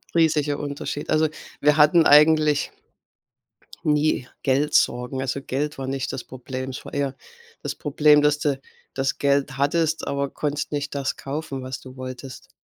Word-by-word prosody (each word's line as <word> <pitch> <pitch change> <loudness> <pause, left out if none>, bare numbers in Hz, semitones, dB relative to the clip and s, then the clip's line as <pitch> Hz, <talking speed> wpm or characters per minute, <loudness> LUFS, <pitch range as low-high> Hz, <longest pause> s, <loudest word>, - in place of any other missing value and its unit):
Riesiger 150 -3 +2
Unterschied. 145 0 -5
Also, 155 0 +3 0.3
wir 150 +1 +4
hatten 155 +2 +6
eigentlich 150 0 +5 1.1
nie 150 -3 +1 0.2
Geldsorgen. 130 -2 +1
Also 135 +1 -2
Geld 145 +3 -2
war 135 -1 -5
nicht 135 -1 -3
das 125 - -5
Problem. 130 +1 -6
Es 130 - -7
war - - -10
eher 140 -1 -1 0.5
das - - -4
Problem, 150 0 +4
dass 150 0 +2
du 145 -2 0 0.3
das 135 0 -1
Geld 140 0 +1
hattest, 160 +3 +1
aber 140 0 -1
konntest 150 +1 -3
nicht 145 -1 -3
das 140 -1 -2
kaufen, 140 -1 -5
was 130 0 -6
du 130 0 -12
wolltest. 130 0 -8
140 Hz, 150 wpm, -23 LUFS, 135-150 Hz, 1.1 s, hatten